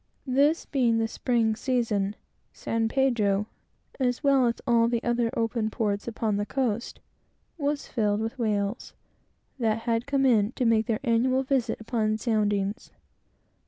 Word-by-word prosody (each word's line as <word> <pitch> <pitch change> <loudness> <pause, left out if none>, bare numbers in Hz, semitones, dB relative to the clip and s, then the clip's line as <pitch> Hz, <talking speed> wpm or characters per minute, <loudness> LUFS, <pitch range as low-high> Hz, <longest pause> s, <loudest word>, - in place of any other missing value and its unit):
This 285 +5 +2
being 240 -5 +1
the 225 0 +1
spring 230 -2 0
season, 220 -5 -1 0.4
San 225 0 -1
Pedro, 220 -7 +1 0.5
as 250 +1 0
well 275 -3 +4
as 235 - 0
all 235 -2 +4
the 235 0 -1
other 240 -1 +1
open 225 -1 0
ports 210 -2 -2
upon 220 -2 -1
the 205 - -1
coast, 240 -4 -2 0.6
was 290 -2 -2
filled 210 -3 0
with 225 +3 -4
whales, 210 0 -2 0.7
that 225 -1 0
had 230 +1 -1
come 275 -1 +1
in 225 -3 +3
to 250 - -1
make 225 0 +3
their 225 -2 0
annual 255 +2 +2
visit 255 -4 0
upon 220 -1 -1
soundings. 210 -1 -1
230 Hz, 145 wpm, -26 LUFS, 215-255 Hz, 0.7 s, well